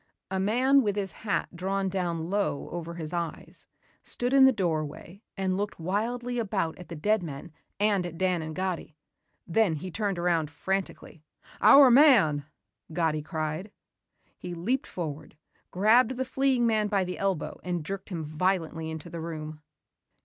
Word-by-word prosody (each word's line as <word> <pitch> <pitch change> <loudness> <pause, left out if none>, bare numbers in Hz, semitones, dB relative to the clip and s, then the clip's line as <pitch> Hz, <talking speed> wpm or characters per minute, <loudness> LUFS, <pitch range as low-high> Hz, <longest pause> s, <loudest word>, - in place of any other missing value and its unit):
A 190 - 0
man 255 +8 +4
with 205 -5 0
his 195 -2 -2
hat 205 -4 -3
drawn 195 +2 -1
down 175 -3 -2
low 200 -8 -1
over 170 -1 -5
his 160 -1 -5
eyes, 170 -2 -5 0.4
stood 245 +2 0
in 270 -1 +8
the 265 - +7
doorway 170 - -3 0.2
and 190 -1 0
looked 205 0 -3
wildly 240 +8 -2
about 195 -7 -1
at 180 - -10
the 170 - -6
dead 210 +7 +1
men 155 0 -7 0.3
and 205 -2 +2
at 170 -1 -9
Dan 185 -2 +1
and 155 0 -6
Gatti. 185 -4 -3 0.5
Then 180 -1 +2
he 185 +5 -6
turned 200 -1 -1
around 170 -3 +1
frantically. 185 -1 -4 0.4
"Our 275 -3 +8
man," 230 - +6 0.5
Gatti 160 -2 0
cried. 155 +4 -4 0.7
He 175 -1 -6
leaped 235 +11 -1
forward, 155 -3 -6 0.3
grabbed 220 +6 +4
the 260 - -1
fleeing 265 -2 +1
man 215 -2 +2
by 200 -2 +1
the 180 0 -5
elbow 195 -4 -2
and 175 -3 -3
jerked 195 +3 -5
him 170 -4 -4
violently 160 0 -1
into 160 0 -7
the 170 -1 -6
room. 155 -2 -6
185 Hz, 160 wpm, -28 LUFS, 165-210 Hz, 0.7 s, in